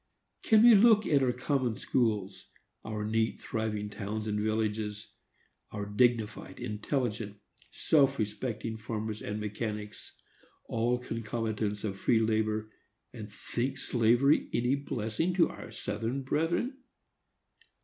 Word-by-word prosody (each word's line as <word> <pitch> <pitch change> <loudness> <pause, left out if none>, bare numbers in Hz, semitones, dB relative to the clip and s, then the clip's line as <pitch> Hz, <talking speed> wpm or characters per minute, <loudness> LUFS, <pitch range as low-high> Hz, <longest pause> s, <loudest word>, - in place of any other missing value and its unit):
Can 220 0 +5
we 240 0 +9
look 215 0 +6
at 140 -3 +3
our 130 -2 +3
common 125 -1 -1
schools, 105 -7 -1 0.4
our 110 -1 -4
neat, 110 +1 0
thriving 110 -2 -3
towns 105 +1 -4
and 105 -1 -1
villages, 110 -1 -2 0.6
our 105 -1 -4
dignified, 115 +1 0
intelligent, 105 -1 -2 0.3
self 140 -3 +3
respecting 110 +1 -3
farmers 110 -1 -4
and 105 +1 -4
mechanics, 105 0 -5 0.5
all 120 +2 +1
concomitants 110 -3 -3
of 100 -3 -3
free 120 - +3
labor, 110 -1 0 0.4
and 110 -4 -8
think 125 +5 -3
slavery 120 +3 +3
any 120 +2 +2
blessing 140 +4 -1
to 180 - +4
our - - -9
Southern 120 +5 -3
brethren? 170 - -1
110 Hz, 120 wpm, -30 LUFS, 105-125 Hz, 0.6 s, we